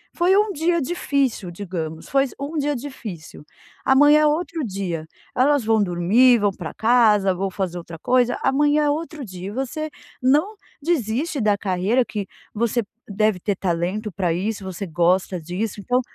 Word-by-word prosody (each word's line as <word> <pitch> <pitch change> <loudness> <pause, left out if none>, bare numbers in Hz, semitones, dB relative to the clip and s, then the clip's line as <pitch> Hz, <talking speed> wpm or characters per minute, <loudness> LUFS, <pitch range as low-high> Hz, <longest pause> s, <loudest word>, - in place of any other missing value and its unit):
Foi 355 +2 +3
um 420 0 +2
dia 340 +1 +1
difícil, 275 - -1
digamos, 170 -4 -6
foi 275 0 +3
um 290 +3 -4
dia 295 0 0
difícil. 225 - -8 0.4
Amanhã 290 +3 +6
é 305 - +5
outro 325 +1 -1
dia. 185 -6 -4 0.3
Elas 280 +1 +3
vão 220 -1 +3
dormir, 205 +8 +4
vão 205 -1 +2
para 175 -4 -7
casa, 220 -4 +4
vão 195 +2 -2
fazer 185 -2 -3
outra 165 -1 -9
coisa. 245 +5 +2
Amanhã 290 +2 +3
é - - +2
outro 310 -1 -3
dia. 185 -2 -8
E - - -7
você 270 +6 -3 0.3
não 300 +12 +2 0.3
desiste 285 -1 -1
da 210 -2 +2
carreira 200 +6 +1
que 205 -4 -5 0.3
você 235 +2 0 0.3
deve 210 -1 +1
ter 200 +2 -1
talento 185 +4 -2
para 180 -2 0
isso. 200 +4 -3
Você 190 +1 -5
gosta 175 +2 +1
disso, 185 +6 -4
então 250 +5 +1
220 Hz, 165 wpm, -22 LUFS, 185-280 Hz, 0.4 s, Amanhã